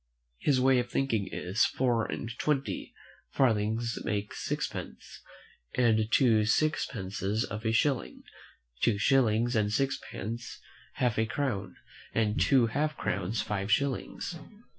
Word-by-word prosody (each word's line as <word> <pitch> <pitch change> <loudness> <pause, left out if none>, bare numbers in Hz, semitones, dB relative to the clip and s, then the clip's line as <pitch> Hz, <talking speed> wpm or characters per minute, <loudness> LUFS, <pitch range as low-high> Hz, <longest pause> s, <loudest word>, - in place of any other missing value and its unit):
His 140 -3 +2
way 130 0 +4
of 120 0 -2
thinking 115 -8 0
is, 95 +5 0
four 120 -3 +1
and 115 - -4
twenty 140 -3 -1 0.4
farthings 115 -1 +1
make 105 -1 -2
sixpence, - - -5 0.5
and 110 -3 +3
two 115 -5 +4
sixpences 105 -5 0
a 110 +2 -1
shilling; 130 +3 0 0.6
two 115 -4 +3
shillings 120 -1 +3
and 105 -1 +2
sixpence 120 -3 -3 0.3
half 120 -4 0
a 110 - +2
crown, 125 -6 -2 0.4
and 110 -2 +1
two 130 -4 +5
half 150 +6 -1
crowns 100 +4 -1
five 105 0 -2
shillings. 140 +6 -1
115 Hz, 120 wpm, -29 LUFS, 105-130 Hz, 0.6 s, two